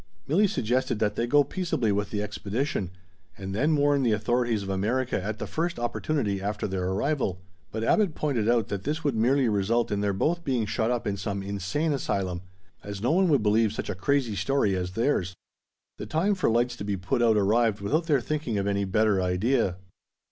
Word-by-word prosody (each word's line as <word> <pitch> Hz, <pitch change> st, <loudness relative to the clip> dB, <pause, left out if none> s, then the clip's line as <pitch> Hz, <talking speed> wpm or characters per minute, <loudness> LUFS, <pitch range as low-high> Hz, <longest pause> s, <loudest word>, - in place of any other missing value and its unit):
Milli 190 Hz, +8 st, +3 dB
suggested 125 Hz, -2 st, 0 dB
that 105 Hz, -1 st, 0 dB
they 120 Hz, -, -1 dB
go 145 Hz, +3 st, +5 dB
peaceably 140 Hz, -, -1 dB
with 100 Hz, 0 st, -1 dB
the 105 Hz, 0 st, -2 dB
expedition, 105 Hz, -, -2 dB, 0.5 s
and 95 Hz, 0 st, -6 dB
then 150 Hz, +9 st, +2 dB
warn 145 Hz, -1 st, +3 dB
the 120 Hz, -4 st, +2 dB
authorities 115 Hz, 0 st, 0 dB
of 95 Hz, -, -6 dB
America 110 Hz, +5 st, 0 dB
at 105 Hz, +1 st, -3 dB
the -, -, -4 dB
first 170 Hz, +2 st, -2 dB
opportunity 120 Hz, -4 st, -1 dB
after 105 Hz, +1 st, -2 dB
their 95 Hz, -2 st, -2 dB
arrival; 100 Hz, -, -1 dB, 0.3 s
but 110 Hz, 0 st, -3 dB
Abbot 195 Hz, -, +2 dB
pointed 125 Hz, -8 st, 0 dB
out 120 Hz, -3 st, +2 dB
that 100 Hz, -2 st, -3 dB
this 155 Hz, +3 st, -2 dB
would 145 Hz, -2 st, +1 dB
merely 125 Hz, +4 st, +3 dB
result 110 Hz, +3 st, +1 dB
in 100 Hz, 0 st, 0 dB
their 100 Hz, -1 st, +1 dB
both 165 Hz, -, 0 dB
being 125 Hz, -7 st, 0 dB
shut 110 Hz, +2 st, -1 dB
up 120 Hz, -1 st, -1 dB
in 100 Hz, -2 st, -1 dB
some 100 Hz, 0 st, -3 dB
insane 100 Hz, -, -1 dB
asylum, 95 Hz, -9 st, -2 dB, 0.4 s
as 100 Hz, -1 st, -6 dB
no 120 Hz, +7 st, +1 dB
one 185 Hz, +2 st, +3 dB
would 140 Hz, -8 st, +3 dB
believe 110 Hz, 0 st, +3 dB
such -, -, -4 dB
a -, -, -2 dB
crazy 120 Hz, +4 st, 0 dB
story 105 Hz, 0 st, +1 dB
as 90 Hz, 0 st, -3 dB
theirs. 100 Hz, -6 st, 0 dB, 0.6 s
The -, -, -6 dB
time 180 Hz, +6 st, +1 dB
for 185 Hz, -9 st, +1 dB
lights 120 Hz, +2 st, +1 dB
to -, -, -5 dB
be 100 Hz, -1 st, -2 dB
put 90 Hz, +6 st, -1 dB
out 115 Hz, -2 st, +4 dB
arrived 110 Hz, +1 st, +2 dB
without 155 Hz, -, 0 dB
their 145 Hz, -5 st, +3 dB
thinking 145 Hz, -5 st, -2 dB
of 100 Hz, -, -1 dB
any 100 Hz, 0 st, 0 dB
better 105 Hz, 0 st, +2 dB
idea. 90 Hz, +1 st, +1 dB
110 Hz, 205 wpm, -27 LUFS, 100-140 Hz, 0.6 s, go